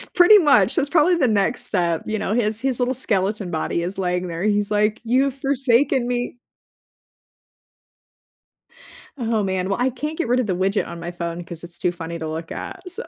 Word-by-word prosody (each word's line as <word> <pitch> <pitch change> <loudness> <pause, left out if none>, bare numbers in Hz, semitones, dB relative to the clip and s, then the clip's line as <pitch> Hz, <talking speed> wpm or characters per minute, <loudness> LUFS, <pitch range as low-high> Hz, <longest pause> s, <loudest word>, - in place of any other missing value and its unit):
Pretty 360 +4 +8
much, 240 - +4
that's 280 - +1
probably 345 +2 +4
the 295 -7 +2
next 215 +2 +1
step. 170 -4 0
You 215 - -2
know, 205 - -2
his 220 -1 0
his 260 -2 0
little 250 +1 +1
skeleton 205 -5 -1
body 165 +1 -2
is 185 +3 -4
laying 180 -1 -1
there. 170 +1 -5
He's 205 -1 +1
like, 210 +1 +1
"You've 260 +4 +2
forsaken 270 -2 +1
me." 245 0 -3 2.8
Oh, 225 -3 0
man. 190 -1 -1
Well, 195 - -1
I 255 - +3
can't 300 +5 -5
get 335 - -1
rid 245 +2 +2
of 250 - 0
the 190 -3 -1
widget 195 +3 0
on 170 - -8
my 170 +1 -5
phone 170 0 -5
'cause 170 -1 -8
it's 170 0 -9
too 175 - +1
funny 170 -1 -7
to 160 - -4
look 160 +1 -6
at, 380 - -7
so 430 +7 -4
210 Hz, 195 wpm, -22 LUFS, 180-255 Hz, 2.8 s, Pretty